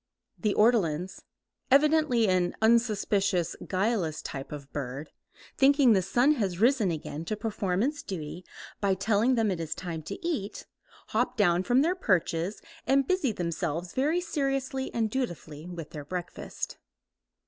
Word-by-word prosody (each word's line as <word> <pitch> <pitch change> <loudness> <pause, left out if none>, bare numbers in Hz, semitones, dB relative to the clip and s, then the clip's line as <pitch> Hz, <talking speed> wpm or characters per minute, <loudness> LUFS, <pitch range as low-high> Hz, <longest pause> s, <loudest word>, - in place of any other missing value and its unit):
The 210 -3 0
ortolans, 190 -6 +2 0.5
evidently 295 -5 +4
an 180 -2 +1
unsuspicious, 205 -5 +2
guileless 185 -6 -1
type 135 0 -6
of 140 -2 -9
bird, 140 +1 -5 0.5
thinking 275 -3 +5
the 190 - +3
sun 240 +10 +3
has 200 - -1
risen 235 -3 +3
again 155 -1 -4
to 215 - -2
perform 205 -3 -1
its 290 +2 -1
duty 175 - -6 0.4
by 195 -2 +2
telling 215 +6 +2
them 225 -3 +2
it 180 - -3
is 160 -2 -3
time 170 -3 -5
to 155 - -6
eat, 235 - -3 0.4
hop 245 +3 0
down 175 -4 +3
from 245 +7 +3
their 340 +3 +2
perches 185 - 0 0.2
and 270 0 +3
busy 370 -9 +1
themselves 170 -2 -3
very 305 +7 +1
seriously 275 -5 -2
and 225 -2 -1
dutifully 170 - -4
with 170 -3 -7
their 150 -2 -7
breakfast. 175 +2 -5
200 Hz, 145 wpm, -28 LUFS, 175-255 Hz, 0.5 s, thinking